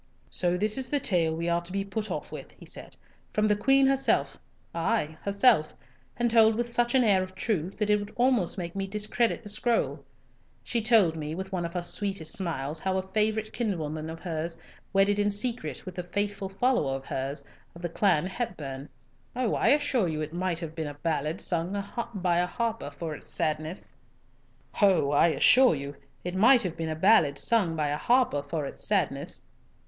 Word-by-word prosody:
"So 180 Hz, 0 st, +1 dB
this 215 Hz, +6 st, +1 dB
is 260 Hz, -, 0 dB
the 290 Hz, -, +1 dB
tale 170 Hz, -9 st, +1 dB
we 170 Hz, +1 st, -3 dB
are 170 Hz, 0 st, +1 dB
to 175 Hz, +1 st, -8 dB
be 195 Hz, +1 st, -2 dB
put 210 Hz, +2 st, -4 dB
off -, -, -5 dB
with," -, -, -9 dB
he -, -, -15 dB
said, -, -, -9 dB, 0.3 s
"from 215 Hz, 0 st, +1 dB
the 210 Hz, -, +3 dB
Queen 270 Hz, +6 st, +4 dB
herself, 270 Hz, 0 st, +2 dB, 0.4 s
ay, 165 Hz, -2 st, -1 dB
herself, 200 Hz, -5 st, +3 dB, 0.4 s
and 240 Hz, -1 st, +1 dB
told 225 Hz, -1 st, +5 dB
with 240 Hz, +1 st, -1 dB
such 240 Hz, +1 st, +1 dB
an 260 Hz, -, +5 dB
air 200 Hz, -4 st, +4 dB
of 185 Hz, 0 st, -6 dB
truth 190 Hz, -3 st, -2 dB
that 210 Hz, -1 st, +1 dB
it 210 Hz, -, +4 dB
would 205 Hz, +1 st, -7 dB
almost 240 Hz, -9 st, +1 dB
make 175 Hz, -1 st, -5 dB
me 195 Hz, 0 st, -2 dB
discredit 210 Hz, +4 st, -1 dB
the 205 Hz, -, -7 dB
scroll. 230 Hz, +3 st, 0 dB, 0.6 s
She 235 Hz, -, -1 dB
told 215 Hz, -7 st, +4 dB
me 155 Hz, 0 st, -4 dB
with 190 Hz, +2 st, -6 dB
one 180 Hz, -2 st, -2 dB
of 170 Hz, -, -6 dB
her 175 Hz, -, -1 dB
sweetest 195 Hz, -3 st, -2 dB
smiles 160 Hz, -4 st, -1 dB
how 190 Hz, +2 st, -1 dB
a 190 Hz, -, -1 dB
favourite 215 Hz, +2 st, -1 dB
kinswoman 160 Hz, -8 st, -3 dB
of 160 Hz, 0 st, -7 dB
hers 165 Hz, -1 st, -4 dB, 0.3 s
wedded 200 Hz, +1 st, +3 dB
in 205 Hz, 0 st, +2 dB
secret 230 Hz, +4 st, -2 dB
with 185 Hz, -1 st, -7 dB
a -, -, -2 dB
faithful 200 Hz, +2 st, -3 dB
follower 195 Hz, -, +1 dB
of 135 Hz, 0 st, -7 dB
hers, 135 Hz, +2 st, -4 dB, 0.3 s
of 170 Hz, -, -12 dB
the -, -, 0 dB
clan 170 Hz, -2 st, +2 dB
Hepburn. 150 Hz, -, -5 dB, 0.5 s
Oh, 245 Hz, -3 st, 0 dB
I -, -, +1 dB
assure 280 Hz, -8 st, +3 dB
you 155 Hz, -2 st, -3 dB
it 155 Hz, +1 st, -5 dB
might 180 Hz, -1 st, -1 dB
have 160 Hz, -2 st, -6 dB
been 160 Hz, -2 st, -4 dB
a 145 Hz, -, -7 dB
ballad 155 Hz, +1 st, -2 dB
sung 175 Hz, +3 st, -1 dB, 0.4 s
by 180 Hz, -3 st, +1 dB
a 180 Hz, -, +1 dB
harper 230 Hz, -5 st, -3 dB
for 155 Hz, +2 st, -6 dB
its -, -, -10 dB
sadness. 155 Hz, +3 st, -2 dB
190 Hz, 165 wpm, -28 LUFS, 165-215 Hz, 0.6 s, told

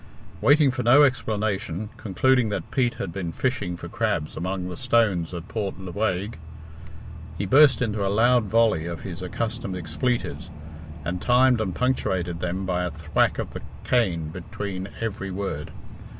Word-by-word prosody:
Waiting 145 Hz, -1 st, +5 dB
for 125 Hz, -, -3 dB
no 130 Hz, +5 st, +7 dB
explanation, 110 Hz, -, -1 dB
concluding 120 Hz, +2 st, +2 dB
that 105 Hz, -, -4 dB
Pete 125 Hz, -3 st, +1 dB
had 90 Hz, -, -4 dB
been 90 Hz, -4 st, -3 dB
fishing 100 Hz, -7 st, -2 dB
for -, -, -8 dB
crabs 110 Hz, -10 st, -1 dB
among 90 Hz, +1 st, -3 dB
the 90 Hz, -, -5 dB
stones 115 Hz, -9 st, +1 dB
of 85 Hz, -1 st, -6 dB
Port 105 Hz, -4 st, -3 dB
Lewaigue, 95 Hz, 0 st, -2 dB, 1.0 s
he 100 Hz, -, -2 dB
burst 135 Hz, +4 st, +6 dB
into 105 Hz, -3 st, -1 dB
a 100 Hz, -, +1 dB
loud 120 Hz, +3 st, +4 dB
volley 110 Hz, -6 st, +2 dB
of 85 Hz, -1 st, -5 dB
his 90 Hz, -3 st, -7 dB
accustomed 110 Hz, +1 st, -3 dB
expletives, 85 Hz, -, -2 dB, 0.6 s
and 90 Hz, +1 st, -3 dB
timed 125 Hz, -1 st, +4 dB
and 95 Hz, -5 st, -2 dB
punctuated 95 Hz, -9 st, 0 dB
them 90 Hz, +2 st, -2 dB
by 90 Hz, -1 st, 0 dB
a 90 Hz, -, -1 dB
thwack 80 Hz, 0 st, 0 dB
of -, -, -4 dB
the -, -, -6 dB, 0.2 s
cane 90 Hz, -11 st, +1 dB
between 95 Hz, +3 st, -5 dB
every 105 Hz, -3 st, -3 dB
word. 90 Hz, -5 st, -4 dB
100 Hz, 155 wpm, -25 LUFS, 90-120 Hz, 1.0 s, no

